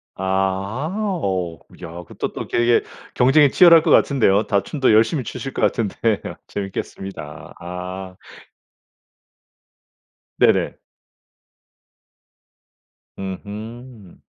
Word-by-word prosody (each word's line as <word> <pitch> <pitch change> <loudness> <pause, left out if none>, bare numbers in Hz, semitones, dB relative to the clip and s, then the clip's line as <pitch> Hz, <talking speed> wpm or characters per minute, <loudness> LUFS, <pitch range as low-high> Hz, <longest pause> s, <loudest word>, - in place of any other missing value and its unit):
아. 95 +8 -1 0.3
어. 90 -5 -2 0.2
야 80 - -7
그것도 - - -5
또 - - -6
되게 120 0 +3 0.3
경쟁이 140 +3 +5
치열할 170 -2 +7
것 - - +1
같은데요. 110 -7 +4
다 100 -2 +2
춤도 135 -6 +1
열심히 115 +6 +3
추실 135 +3 -6
것 - - -4
같은데 110 -1 0 0.3
재미있겠습니다. 95 -5 -7
아. 90 +1 -7 2.2
네네. - - +3 2.4
으흠. 105 +3 -8
100 Hz, 185 characters per minute, -21 LUFS, 95-120 Hz, 2.4 s, 치열할